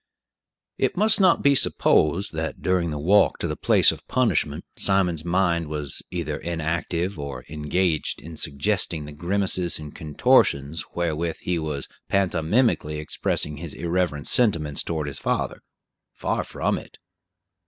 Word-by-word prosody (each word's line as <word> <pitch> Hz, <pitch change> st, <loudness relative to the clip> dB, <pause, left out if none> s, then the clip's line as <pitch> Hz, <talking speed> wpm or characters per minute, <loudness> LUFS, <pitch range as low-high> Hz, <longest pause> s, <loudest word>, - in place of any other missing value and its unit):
It -, -, 0 dB
must 215 Hz, +1 st, +5 dB
not 185 Hz, -3 st, +4 dB
be 140 Hz, -, +5 dB
supposed 90 Hz, -, +2 dB
that, 80 Hz, 0 st, -4 dB
during 90 Hz, -2 st, +1 dB
the 75 Hz, -, -3 dB
walk 95 Hz, +8 st, +3 dB
to -, -, -2 dB
the -, -, -3 dB
place -, -, +4 dB
of -, -, -10 dB
punishment, -, -, 0 dB
Simon's 90 Hz, -5 st, +1 dB
mind 85 Hz, -2 st, +1 dB
was 75 Hz, -2 st, -3 dB
either 80 Hz, -4 st, -3 dB
inactive, 85 Hz, +2 st, -2 dB
or 70 Hz, -3 st, -6 dB
engaged 80 Hz, +2 st, -1 dB
in 80 Hz, +1 st, -10 dB
suggesting 80 Hz, +2 st, 0 dB
the 75 Hz, -, -9 dB
grimaces 90 Hz, +2 st, +1 dB
and 75 Hz, -1 st, -9 dB
contortions 75 Hz, 0 st, +2 dB
wherewith 85 Hz, -1 st, -1 dB
he 90 Hz, -1 st, -1 dB
was 75 Hz, -3 st, -4 dB, 0.2 s
pantomimically 90 Hz, -, +1 dB
expressing 75 Hz, -1 st, -1 dB
his 80 Hz, -1 st, -6 dB
irreverent 85 Hz, -4 st, -1 dB
sentiments 80 Hz, -, +2 dB
toward 80 Hz, -2 st, -3 dB
his 70 Hz, -1 st, -5 dB
father. -, -, -2 dB, 0.5 s
Far -, -, -1 dB
from -, -, -2 dB
it. -, -, -15 dB
85 Hz, 140 wpm, -24 LUFS, 75-90 Hz, 0.5 s, must